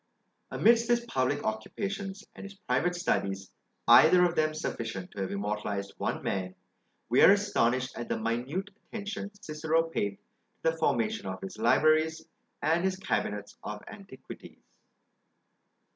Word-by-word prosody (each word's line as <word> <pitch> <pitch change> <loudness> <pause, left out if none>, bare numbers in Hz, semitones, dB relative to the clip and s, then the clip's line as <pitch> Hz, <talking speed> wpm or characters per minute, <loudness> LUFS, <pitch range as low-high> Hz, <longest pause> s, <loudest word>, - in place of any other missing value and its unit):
Amidst 230 +1 +4
his 240 0 +2
public 140 - 0
occupations 195 - -4
and - - -10
his 200 0 -9
private 180 -3 0
studies, 100 - -1 0.4
either 180 0 +8
of 175 - +1
them 155 -2 +1
sufficient 115 - -4
to 100 - -6
have 95 - -2
immortalised 100 0 -3
one - - -2
man, 95 -1 -2 0.5
we 120 +3 +3
are - - +9
astonished 130 - +1
at 120 - -6
the - - 0
minute 125 - -2 0.2
attention 205 -1 -5
Cicero 160 -1 0
paid 100 -12 -2 0.5
to 160 - +4
the 165 - -9
formation 215 +5 0
of - - -4
his 195 0 -8
libraries 160 +1 +3 0.4
and 165 +3 +2
his 190 0 +1
cabinets 105 - -3
of 105 0 -6
antiquities. 195 -12 -12
155 Hz, 140 wpm, -29 LUFS, -, 0.5 s, are